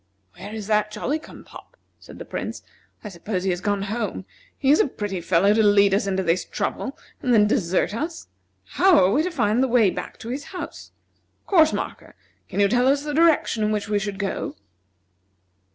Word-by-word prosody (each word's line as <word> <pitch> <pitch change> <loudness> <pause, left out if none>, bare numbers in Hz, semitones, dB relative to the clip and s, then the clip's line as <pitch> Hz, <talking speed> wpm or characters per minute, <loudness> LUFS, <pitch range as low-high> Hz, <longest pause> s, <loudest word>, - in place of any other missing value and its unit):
"Where 205 - -9
is 215 -2 -6
that 210 0 +1
Jolly 240 +8 -2
cum - - -13
pop?" - - -15 0.2
said - - -13
the - - -8
Prince. - - -5 0.4
"I 210 - -6
suppose 185 +1 -4
he 190 - +1
has 175 0 -3
gone 205 -1 -1
home. 210 -2 -4 0.3
He 270 - +2
is 300 - +5
a - - +4
pretty 205 -7 -4
fellow 185 +4 +3
to 220 - +3
lead 205 -2 +4
us 200 0 +1
into 190 -1 0
this 170 0 +1
trouble 270 - -4 0.2
and 255 - 0
then 210 -1 +5
desert 205 -4 0
us! 320 +8 -4 0.4
How 375 -3 +4
are 185 -5 +4
we 285 - +3
to 355 - -1
find 245 - +1
the 265 - +2
way 235 -6 +4
back - - -7
to 230 - -7
his 280 +4 -4
house? 365 +3 -8 0.6
Course 320 -5 +4
marker, - - -6 0.3
can - - -4
you 200 - +5
tell 245 +4 +2
us 280 +1 +2
the 295 0 -4
direction 310 -8 +3
in 210 - +1
which 210 0 -2
we 205 -1 +1
should 200 -1 -4
go?" 200 -1 -3
210 Hz, 205 wpm, -23 LUFS, 200-270 Hz, 0.6 s, is